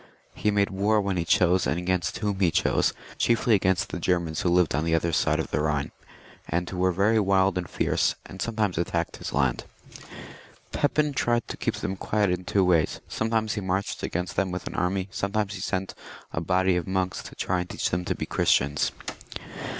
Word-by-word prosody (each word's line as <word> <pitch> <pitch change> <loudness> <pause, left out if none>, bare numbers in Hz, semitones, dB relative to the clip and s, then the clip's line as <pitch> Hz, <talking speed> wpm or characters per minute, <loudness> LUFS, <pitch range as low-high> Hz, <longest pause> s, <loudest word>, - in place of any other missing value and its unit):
He 105 - 0
made 100 -1 +2
war 105 +3 +2
when 100 -2 -1
he 85 - 0
chose 90 +2 +3
and 80 - 0
against 90 0 -1
whom 105 -3 -2
he 90 -4 +4
chose, 90 +3 +2 0.3
chiefly 115 0 +3
against 95 -1 +2
the - - -4
Germans 85 -2 0
who 90 - +1
lived 90 -1 +3
on 75 +3 0
the 80 0 +2
other 85 0 0
side - - +2
of - - -3
the - - 0
Ehine, 75 -2 0 0.6
and 85 +2 -1
who 90 - -5
were 95 +1 +3
very 100 +5 +3
wild 95 -2 +3
and 90 -1 -3
fierce, - - +1
and 95 - -9
sometimes 110 -6 0
attacked 85 -1 -1
his - - -6
land. 65 -4 0 1.1
Pepin 150 0 +1
tried 120 -3 +1
to - - -4
keep - - -2
them 95 - -3
quiet 105 0 0
in 90 0 -2
two 95 0 +2
ways; 85 -4 +2
some 110 - -2
times 110 -2 +1
he 105 - -3
marched 95 +1 -2
against 90 0 -3
them 95 -1 +1
with 90 0 -5
an - - -5
army, 90 +2 0
sometimes 100 +1 -1
he 95 - -6
sent 95 -2 -2 0.4
a 80 - -1
body 90 +2 +2
of 90 -2 -2
monks 95 -1 -1
to - - -11
try 90 -1 -1
and 90 - -4
teach - - -2
them 90 +1 0
to - - -1
be - - -4
Christians. 70 +1 +2
95 Hz, 210 wpm, -26 LUFS, 85-100 Hz, 1.1 s, he